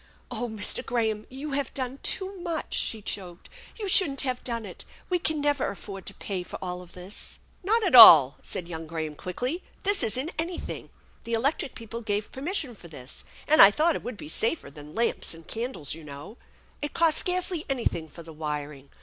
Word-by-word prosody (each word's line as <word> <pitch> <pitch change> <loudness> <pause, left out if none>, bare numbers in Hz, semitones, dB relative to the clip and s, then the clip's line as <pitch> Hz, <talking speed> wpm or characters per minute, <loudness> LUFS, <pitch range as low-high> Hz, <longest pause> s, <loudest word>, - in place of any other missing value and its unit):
"Oh 245 0 -3
Mr. 215 -2 +2
Graham! 220 -3 -1
You 275 +3 -7
have 275 -2 -2
done 260 0 -4
too 385 +1 +1
much!" 335 -3 -3
she 220 -2 0
choked. 180 -4 -6
" - - -21
You 415 - -3
shouldn't 320 -8 +5
have 255 -2 -2
done 230 -3 -3
it! 185 - -8 0.3
We 360 - +2
can 315 -2 0
never 290 -2 +1
afford 195 -1 -9
to - - -6
pay 190 -3 -4
for 180 - -8
all 180 -1 -5
this! 180 +3 -7
" - - -34
" - - -36
Not 445 +4 +2
at 360 - 0
all 165 - +11
1 - - -32
" - - -29
said 175 - -4
young 165 -2 -7
Graham 160 -1 -4
quickly. 250 - -4
" - - -32
This 405 0 +2
isn't 260 +9 -2
anything. 340 +2 -4 0.3
The 230 - -5
electric 265 +3 0
people 230 +1 -7
gave 205 -1 -2
permission 285 -1 -2
for 185 -5 -14
this, 135 -5 -9 0.2
and 310 +1 +6
I 195 - +11
thought 310 +9 +1
it - - -4
would 245 -3 -7
be - - -9
safer 220 - 0
than 150 +1 -12
lamps 230 -6 0
and 165 0 -14
candles, 225 - -4
you 160 0 -9
know. 145 - -10 0.4
It 295 - -5
cost 325 -2 +4
scarcely 360 -2 +1
anything 230 -11 -2
for 170 +3 -12
the 165 0 -11
wiring. 150 -2 -5
230 Hz, 210 wpm, -27 LUFS, 170-290 Hz, 0.4 s, all